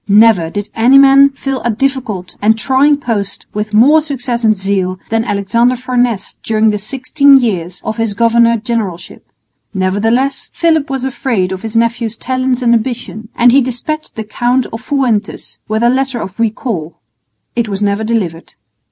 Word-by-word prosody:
Never 205 Hz, -5 st, +4 dB
did 205 Hz, +3 st, -5 dB
any 245 Hz, +4 st, +4 dB
man 275 Hz, 0 st, +6 dB
fill 270 Hz, -1 st, -4 dB
a 240 Hz, -, -1 dB
difficult 230 Hz, -6 st, -2 dB
and 220 Hz, +2 st, +3 dB
trying 275 Hz, +5 st, +2 dB
post 225 Hz, -8 st, -4 dB
with 210 Hz, +1 st, -3 dB
more 270 Hz, +9 st, +5 dB
success 250 Hz, -5 st, -4 dB
and 215 Hz, -2 st, +3 dB
zeal 190 Hz, -1 st, -1 dB
than 225 Hz, 0 st, +1 dB
Alexander 230 Hz, +3 st, +1 dB
Farnese 245 Hz, -4 st, -2 dB
during 220 Hz, 0 st, +1 dB
the 210 Hz, -, -3 dB
sixteen 275 Hz, +5 st, +3 dB
years 185 Hz, -8 st, -2 dB
of 220 Hz, -, -4 dB
his 225 Hz, -3 st, -1 dB
governor 235 Hz, +1 st, +3 dB
generalship. 215 Hz, -7 st, -5 dB, 0.4 s
Nevertheless 225 Hz, +9 st, 0 dB
Philip 320 Hz, -4 st, +1 dB
was 265 Hz, -1 st, -3 dB
afraid 240 Hz, -8 st, -1 dB
of 190 Hz, 0 st, -5 dB
his 225 Hz, 0 st, -7 dB
nephew's 230 Hz, -1 st, 0 dB
talents 255 Hz, 0 st, -1 dB
and 235 Hz, -1 st, +3 dB
ambition, 230 Hz, -2 st, -3 dB
and 245 Hz, 0 st, +5 dB
he 275 Hz, +3 st, +5 dB
despatched 260 Hz, +5 st, -4 dB
the 220 Hz, -, -4 dB
Count 240 Hz, +4 st, 0 dB
of 225 Hz, -, -6 dB
Fuentes 250 Hz, -7 st, -2 dB
with 220 Hz, +1 st, -1 dB
a 235 Hz, -, +4 dB
letter 265 Hz, -1 st, -1 dB
of 190 Hz, 0 st, -7 dB
recall. 210 Hz, -8 st, -3 dB, 0.6 s
It 235 Hz, -2 st, -1 dB
was 200 Hz, +1 st, -2 dB
never 200 Hz, +1 st, 0 dB
delivered. 195 Hz, -8 st, -3 dB
230 Hz, 165 wpm, -14 LUFS, 210-260 Hz, 0.6 s, man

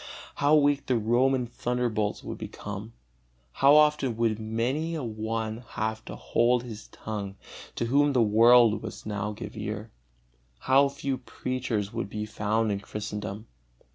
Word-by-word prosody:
How 145 Hz, +2 st, +4 dB
weak 145 Hz, -1 st, +3 dB
the 125 Hz, -, +2 dB
Roman 125 Hz, +3 st, +2 dB
thunderbolts 120 Hz, -3 st, -2 dB
would -, -, -6 dB
become! 105 Hz, +2 st, -7 dB, 0.6 s
How 140 Hz, -, +5 dB
often 150 Hz, -6 st, +3 dB
would 115 Hz, -2 st, +1 dB
many 125 Hz, +9 st, -1 dB
a 155 Hz, -, -3 dB
one 110 Hz, 0 st, -3 dB, 0.2 s
have 110 Hz, -1 st, -2 dB
to -, -, -7 dB
hold 120 Hz, +1 st, +2 dB
his 110 Hz, -3 st, -9 dB
tongue, 100 Hz, -3 st, -6 dB, 0.4 s
to -, -, -1 dB
whom 140 Hz, +4 st, +3 dB
the 125 Hz, -3 st, +4 dB
world 115 Hz, +1 st, +6 dB
must 110 Hz, -, -8 dB
now 105 Hz, 0 st, -2 dB
give 105 Hz, -, -8 dB
ear! 105 Hz, +1 st, -5 dB, 0.7 s
How 135 Hz, +2 st, +4 dB
few 140 Hz, -1 st, -3 dB
preachers 125 Hz, -5 st, -3 dB
would -, -, -3 dB
be 105 Hz, +1 st, -4 dB
found 110 Hz, +1 st, 0 dB
in 100 Hz, -, -1 dB
Christendom! 105 Hz, 0 st, -6 dB
115 Hz, 145 wpm, -27 LUFS, 105-130 Hz, 0.7 s, world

